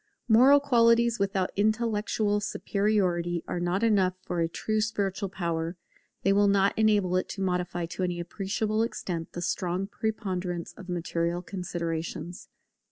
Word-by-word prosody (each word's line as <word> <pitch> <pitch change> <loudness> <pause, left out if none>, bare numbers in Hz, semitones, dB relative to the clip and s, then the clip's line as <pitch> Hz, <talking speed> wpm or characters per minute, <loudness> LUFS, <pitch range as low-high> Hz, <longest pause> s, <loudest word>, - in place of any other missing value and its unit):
Moral 255 +5 +7
qualities 235 -4 +3
without 195 -1 0
intellectual 215 0 +1
superiority 185 -5 0
are 175 - -2
not 175 +4 0
enough 195 -5 +3
for 175 - -3
a 165 - +2
true 215 +6 -1
spiritual 200 -2 -1
power; 170 -2 -3 0.5
they 195 - +4
will 205 0 +4
not 200 0 +3
enable 205 -4 +3
it 185 - -2
to - - -6
modify 180 -2 -1
to 170 +3 -6
any 180 -1 -1
appreciable 210 +5 -1
extent 175 -7 -3
the 175 - -4
strong 180 +2 -1
preponderance 185 -5 -3
of 185 -3 -12
material 170 0 -1
considerations. 170 -2 -5
190 Hz, 140 wpm, -28 LUFS, 175-215 Hz, 0.5 s, Moral